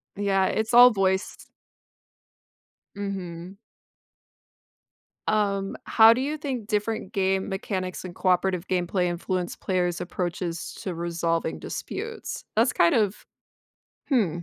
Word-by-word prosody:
Yeah, 195 -1 +2
it's 220 +2 -1
all 245 +1 +9
voice. 190 -2 0 1.6
Mhm. 190 -2 -6 1.7
Um, 200 -2 0
how 225 0 +7
do 255 - -2
you 300 +3 -2
think 260 -8 -4
different 215 -1 -2
game 190 0 0
mechanics 190 -2 -3
and 180 0 -8
cooperative 185 -1 +1
gameplay 180 0 0
influence 175 +1 -2
players' 180 -2 -1
approaches 175 -1 -4
to 185 -5 -3
resolving 170 -1 -1
disputes? 455 0 -6
That's - - +3
kind 335 - +4
of 210 -3 0 0.8
hmm. 230 - +3
190 Hz, 110 wpm, -26 LUFS, 180-215 Hz, 1.7 s, all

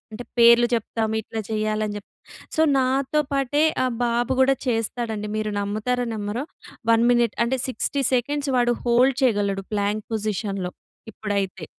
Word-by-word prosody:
అంటే 240 +3 -7
పేర్లు 235 0 +7
చెప్తాం 225 -1 -1
ఇట్లా 220 +1 -5
చేయాలని 215 -1 -1
చెప్పి. 205 - -10 0.5
సో, 315 - +4 0.2
నాతో 265 +3 +1
పాటే 275 +2 +1 0.2
ఆ - - +2 0.2
బాబు 240 +1 0
కూడా 270 +1 +5
చేస్తాడండి. 225 -2 -2
మీరు 215 0 -1
నమ్ముతారో 215 +5 -1
నమ్మరో. 215 +5 -3 0.5
1 230 +1 +4
మినిట్ 240 -2 +2
అంటే 260 +2 -1
60 275 +3 -2
సెకండ్స్ 285 +3 -1
వాడు 240 -1 +3
హోల్డ్ 245 +2 +4
చేయగలడు. 200 -5 +1
ప్లాంక్ 205 +1 -1
పొజిషన్‌లో 200 -3 -2 0.4
ఇప్పుడైతే. 195 -4 -3
230 Hz, 140 wpm, -23 LUFS, 210-250 Hz, 0.5 s, పేర్లు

